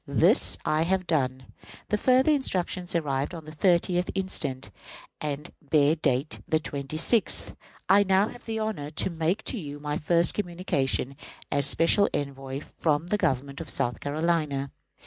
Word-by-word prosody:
This -, -, +4 dB
I 155 Hz, +1 st, +2 dB
have 185 Hz, +2 st, +1 dB
done. 130 Hz, -6 st, -1 dB, 0.4 s
The 210 Hz, -, +2 dB
further 260 Hz, +5 st, +4 dB
instructions 185 Hz, -, 0 dB
arrived 145 Hz, 0 st, -1 dB
on 160 Hz, -2 st, -9 dB
the 155 Hz, -, -9 dB
30th 175 Hz, +2 st, +2 dB
instant 150 Hz, -9 st, -2 dB, 0.5 s
and 150 Hz, -1 st, -4 dB
bear 145 Hz, 0 st, +3 dB
date 145 Hz, -2 st, -1 dB
the 155 Hz, -, +2 dB
26th. 155 Hz, -, 0 dB, 0.3 s
I 195 Hz, +2 st, +6 dB
now 195 Hz, +1 st, +3 dB
have 245 Hz, -, -13 dB
the 225 Hz, -1 st, -3 dB
honor 215 Hz, -10 st, -3 dB
to 160 Hz, +4 st, -1 dB
make 170 Hz, +6 st, -1 dB
to 245 Hz, -, -1 dB
you 145 Hz, -4 st, -7 dB
my 150 Hz, 0 st, -3 dB
first 170 Hz, +2 st, +3 dB
communication 170 Hz, -8 st, -1 dB, 0.4 s
as 140 Hz, -1 st, +2 dB
special 185 Hz, +7 st, +4 dB
envoy 135 Hz, -1 st, -4 dB, 0.2 s
from 155 Hz, +1 st, +1 dB
the 210 Hz, -, +2 dB
government 140 Hz, -1 st, -1 dB
of -, -, -8 dB
South 120 Hz, 0 st, -1 dB
Carolina. 150 Hz, -2 st, -1 dB
155 Hz, 150 wpm, -27 LUFS, 140-185 Hz, 0.5 s, I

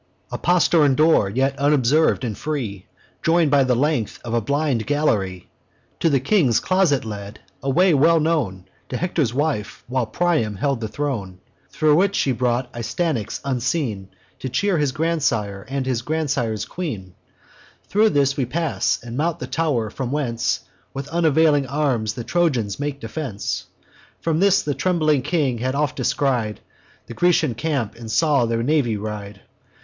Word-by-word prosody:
"A -, -, -3 dB
postern 165 Hz, -5 st, +3 dB
door, 155 Hz, -9 st, +4 dB
yet 135 Hz, +6 st, 0 dB
unobserv'd 145 Hz, +1 st, +3 dB
and 115 Hz, -4 st, -2 dB
free, 115 Hz, -11 st, -4 dB, 0.3 s
Join'd 165 Hz, -3 st, +3 dB
by 140 Hz, -1 st, +5 dB
the 130 Hz, -1 st, +2 dB
length 135 Hz, -4 st, 0 dB
of 115 Hz, -, -4 dB
a 120 Hz, -, +2 dB
blind 140 Hz, -1 st, 0 dB
gallery, 105 Hz, -12 st, 0 dB, 0.5 s
To 165 Hz, -, +3 dB
the 140 Hz, -3 st, +3 dB
king's 135 Hz, -, +3 dB
closet 185 Hz, -9 st, +2 dB
led: 105 Hz, -1 st, -7 dB, 0.2 s
a 135 Hz, -, -2 dB
way 180 Hz, +5 st, +4 dB
well 160 Hz, +4 st, +5 dB
known 145 Hz, -, -1 dB, 0.2 s
To 125 Hz, -, -3 dB
Hector's 160 Hz, -8 st, 0 dB
wife, 125 Hz, -7 st, -2 dB
while 125 Hz, -2 st, -1 dB
Priam 135 Hz, -6 st, 0 dB
held 135 Hz, +4 st, -1 dB
the 110 Hz, -, -2 dB
throne, 105 Hz, -9 st, -4 dB, 0.3 s
Thro' 155 Hz, -1 st, +2 dB
which 195 Hz, +5 st, +3 dB
she 135 Hz, -, +1 dB
brought 125 Hz, 0 st, -1 dB
Astyanax, 120 Hz, -, -2 dB
unseen, 125 Hz, -, -2 dB, 0.3 s
To 130 Hz, -, -4 dB
cheer 195 Hz, +5 st, +1 dB
his 145 Hz, -3 st, +1 dB
grandsire 130 Hz, -11 st, -1 dB
and 135 Hz, -1 st, -2 dB
his 125 Hz, -3 st, -1 dB
grandsire's 125 Hz, -7 st, -1 dB
queen. 115 Hz, -, -5 dB, 0.7 s
Thro' 215 Hz, +2 st, +3 dB
this 140 Hz, -5 st, +2 dB
we 135 Hz, -, 0 dB
pass, 160 Hz, +4 st, 0 dB
and 120 Hz, 0 st, -7 dB
mount 165 Hz, +4 st, 0 dB
the -, -, -5 dB
tow'r, 135 Hz, -7 st, -1 dB
from 130 Hz, 0 st, -4 dB
whence 125 Hz, -6 st, -1 dB, 0.3 s
With 135 Hz, +1 st, -5 dB
unavailing 160 Hz, -4 st, +3 dB
arms 130 Hz, -6 st, 0 dB
the 120 Hz, -, -5 dB
Trojans 125 Hz, -, 0 dB
make 145 Hz, -1 st, -3 dB
defence. 115 Hz, -3 st, -4 dB, 0.5 s
From 165 Hz, -1 st, 0 dB
this 200 Hz, 0 st, +4 dB
the 145 Hz, -, -1 dB
trembling 155 Hz, -5 st, +1 dB
king 135 Hz, -6 st, 0 dB
had 130 Hz, +3 st, -1 dB
oft 145 Hz, -1 st, 0 dB
descried 120 Hz, -7 st, 0 dB, 0.5 s
The -, -, -9 dB
Grecian 165 Hz, -4 st, +2 dB
camp, 135 Hz, -3 st, -2 dB
and 115 Hz, -1 st, -10 dB
saw 140 Hz, -1 st, +2 dB
their 115 Hz, 0 st, -1 dB
navy 130 Hz, -6 st, +1 dB
ride. 105 Hz, -1 st, -6 dB
135 Hz, 160 wpm, -22 LUFS, 115-155 Hz, 0.7 s, by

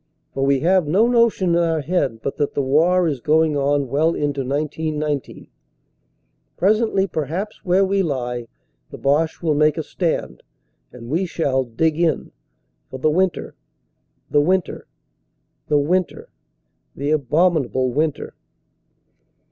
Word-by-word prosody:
For 135 Hz, -, -2 dB
we 135 Hz, -1 st, +2 dB
have 180 Hz, 0 st, +2 dB
no 195 Hz, +9 st, +3 dB
notion 235 Hz, -6 st, +2 dB
in 170 Hz, -, +3 dB
our 165 Hz, -2 st, +1 dB
head 140 Hz, -8 st, -1 dB
but 140 Hz, -, -3 dB
that 145 Hz, -2 st, -1 dB
the -, -, +1 dB
war 170 Hz, +6 st, +3 dB
is 145 Hz, -5 st, -2 dB
going 155 Hz, +3 st, +2 dB
on 140 Hz, 0 st, +1 dB
well 155 Hz, +6 st, +1 dB
into 145 Hz, -2 st, -1 dB
1919. 150 Hz, +1 st, -3 dB, 1.1 s
Presently 205 Hz, +1 st, +2 dB
perhaps 180 Hz, +5 st, -4 dB
where 190 Hz, 0 st, +3 dB
we 195 Hz, +1 st, +1 dB
lie 125 Hz, -7 st, -3 dB, 0.4 s
the -, -, -9 dB
Boche 150 Hz, +5 st, 0 dB
will 160 Hz, -2 st, +2 dB
make 150 Hz, +1 st, +2 dB
a 160 Hz, -, -2 dB
stand; 170 Hz, +2 st, -3 dB, 0.5 s
and 115 Hz, -, -11 dB
we 180 Hz, +4 st, 0 dB
shall 135 Hz, -6 st, 0 dB
"dig 155 Hz, +7 st, -1 dB
in" 170 Hz, -2 st, 0 dB, 0.6 s
for -, -, -7 dB
the 155 Hz, +4 st, +1 dB
winter 185 Hz, +2 st, 0 dB, 0.8 s
the 145 Hz, -, +4 dB
winter, 180 Hz, +2 st, -1 dB, 0.8 s
the 150 Hz, -, +2 dB
winter, 175 Hz, +5 st, -1 dB, 0.7 s
the 140 Hz, +2 st, -2 dB
abominable 145 Hz, -3 st, +1 dB
winter. 150 Hz, +1 st, -1 dB
155 Hz, 135 wpm, -21 LUFS, 140-175 Hz, 1.1 s, the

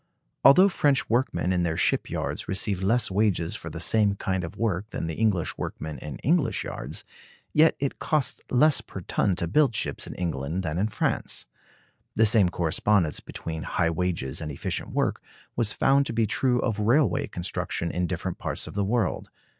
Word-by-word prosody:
Although 180 Hz, +8 st, +8 dB
French 145 Hz, -9 st, +1 dB
workmen 120 Hz, -6 st, +1 dB
in 90 Hz, -, +1 dB
their 85 Hz, -2 st, -1 dB
ship -, -, +1 dB
yards -, -, -3 dB
receive 95 Hz, 0 st, 0 dB
less 115 Hz, +3 st, +2 dB
wages 95 Hz, -4 st, +1 dB
for 80 Hz, -, -7 dB
the 85 Hz, +1 st, -7 dB
same 100 Hz, +3 st, +3 dB
kind 95 Hz, -2 st, -2 dB
of 85 Hz, -, -7 dB
work 105 Hz, -3 st, -1 dB
than -, -, -4 dB
the 80 Hz, -, -3 dB
English 100 Hz, -4 st, 0 dB
workmen 75 Hz, -3 st, -5 dB
in 75 Hz, 0 st, -7 dB
English 165 Hz, 0 st, +2 dB
yards, -, -, -6 dB, 0.5 s
yet 160 Hz, +2 st, +5 dB
it 140 Hz, -1 st, -2 dB
costs 150 Hz, -4 st, 0 dB
less 145 Hz, +3 st, +4 dB
per 95 Hz, -, -9 dB
ton 95 Hz, +1 st, 0 dB
to 85 Hz, -, -1 dB
build 130 Hz, -, +3 dB
ships -, -, -2 dB
in -, -, -7 dB
England 80 Hz, +1 st, -3 dB
than 80 Hz, 0 st, -2 dB
in 105 Hz, -, +2 dB
France. 105 Hz, -1 st, -2 dB, 0.7 s
The 110 Hz, -, +5 dB
same 105 Hz, -4 st, +4 dB
correspondence 85 Hz, 0 st, +1 dB
between 80 Hz, -1 st, -6 dB
high 85 Hz, +1 st, 0 dB
wages 85 Hz, -6 st, -2 dB
and 75 Hz, -1 st, -4 dB
efficient 70 Hz, -, -4 dB
work -, -, -1 dB, 0.3 s
was 115 Hz, -3 st, +1 dB
found 140 Hz, +4 st, +3 dB
to -, -, -4 dB
be 115 Hz, 0 st, +2 dB
true 125 Hz, +3 st, +1 dB
of 110 Hz, -4 st, -1 dB
railway 135 Hz, +5 st, +2 dB
construction 85 Hz, -1 st, -3 dB
in 90 Hz, 0 st, -1 dB
different -, -, -4 dB
parts -, -, -3 dB
of -, -, -9 dB
the 100 Hz, -, 0 dB
world. 110 Hz, 0 st, -1 dB
100 Hz, 185 wpm, -26 LUFS, 85-120 Hz, 0.7 s, Although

